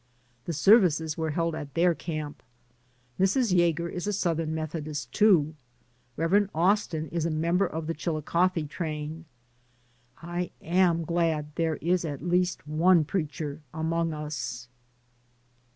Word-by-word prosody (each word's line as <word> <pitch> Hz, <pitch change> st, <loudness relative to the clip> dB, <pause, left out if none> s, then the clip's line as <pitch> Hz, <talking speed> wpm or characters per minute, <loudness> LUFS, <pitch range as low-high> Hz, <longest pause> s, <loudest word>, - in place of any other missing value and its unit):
The 170 Hz, -, -3 dB
services 160 Hz, -5 st, +4 dB
were 160 Hz, -1 st, -2 dB
held 165 Hz, +2 st, 0 dB
at 145 Hz, -3 st, -7 dB
their 175 Hz, +1 st, +4 dB
camp. 155 Hz, -3 st, -5 dB, 0.8 s
Mrs. 195 Hz, +2 st, +2 dB
Yager 170 Hz, -1 st, +2 dB
is 180 Hz, +3 st, -5 dB
a 210 Hz, -, 0 dB
Southern 165 Hz, -4 st, 0 dB
Methodist, 150 Hz, -4 st, -4 dB
too. 170 Hz, -7 st, +4 dB, 0.6 s
Rev. 195 Hz, +5 st, +2 dB
Austin 170 Hz, -2 st, +1 dB
is 170 Hz, -1 st, -1 dB
a -, -, -1 dB
member 170 Hz, +4 st, +1 dB
of 160 Hz, -1 st, -5 dB
the 165 Hz, -, -2 dB
Chilicothe 165 Hz, +1 st, 0 dB
train. 155 Hz, 0 st, -5 dB, 0.9 s
I 175 Hz, +1 st, -3 dB
am 170 Hz, -1 st, +2 dB
glad 160 Hz, -3 st, 0 dB
there 165 Hz, -1 st, 0 dB
is 175 Hz, +4 st, 0 dB
at 145 Hz, -1 st, -5 dB
least 180 Hz, -2 st, 0 dB
one 165 Hz, +2 st, +4 dB
preacher 150 Hz, -3 st, -3 dB
among 165 Hz, +1 st, 0 dB
us. 125 Hz, -6 st, -5 dB
165 Hz, 130 wpm, -27 LUFS, 155-175 Hz, 0.9 s, services